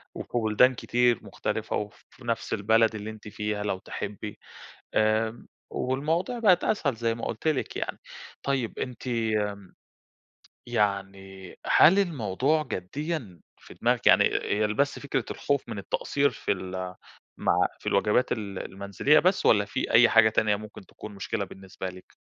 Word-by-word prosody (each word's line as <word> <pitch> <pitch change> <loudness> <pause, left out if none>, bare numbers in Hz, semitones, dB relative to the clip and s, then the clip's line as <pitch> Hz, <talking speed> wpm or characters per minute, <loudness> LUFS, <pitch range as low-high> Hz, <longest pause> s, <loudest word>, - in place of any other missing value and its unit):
وفي - - -7
بُلدان 115 +3 +4
كتير 120 -1 +2
مختلِفة - - -3
وفي 105 +4 -7
نفس 115 -1 -2
البلد 110 +2 +3
اللي 105 0 -5
أنتِ 110 -1 -10
فيها 105 0 -3
لو 100 -2 -1
تحبّي 105 +2 -6 0.6
آمم، 110 +2 +1 0.2
والمواضيع 160 - -1
بقِت 190 -6 +4
أسهل 140 - 0
زي 115 0 -1
ما 115 - -5
قُلت 115 +7 -4
لِك 155 -4 0
يعني. - - -4 0.4
طيب 135 -5 -1
أنتِ 125 0 -5
امم، 105 -5 -2 0.9
يعني 95 -4 -2
هل 190 +6 +6
الموضوع 145 - +1
جديًا 125 - -5 0.2
في - - -14
دماغِك، - - +1
يعني - - +7
إ - - +1
إ - - -7
هي 105 +1 +2
ال 105 - -1
بس 140 +4 0
فكرة 135 -4 -2
الخوف 140 -1 -1
من - - -5
التقصير 140 +7 0
في 125 - -3
ال 95 -1 -4 0.4
مع - - +2
في - - -20
الواجبات 105 +5 +2
ال 100 -4 -3
المنزلية 100 +10 +2
بس 185 +2 +2
والّا 105 -2 +5
في 130 +6 -3
أي 120 +1 +7
حاجة 115 -1 +6
تانية 110 -1 +2
ممكن 105 -1 -10
تكون 105 +1 -11
مشكلة 100 +1 -3
بالنسبة 95 0 -8
لِك؟ 95 0 -14
110 Hz, 155 wpm, -27 LUFS, 100-130 Hz, 0.9 s, يعني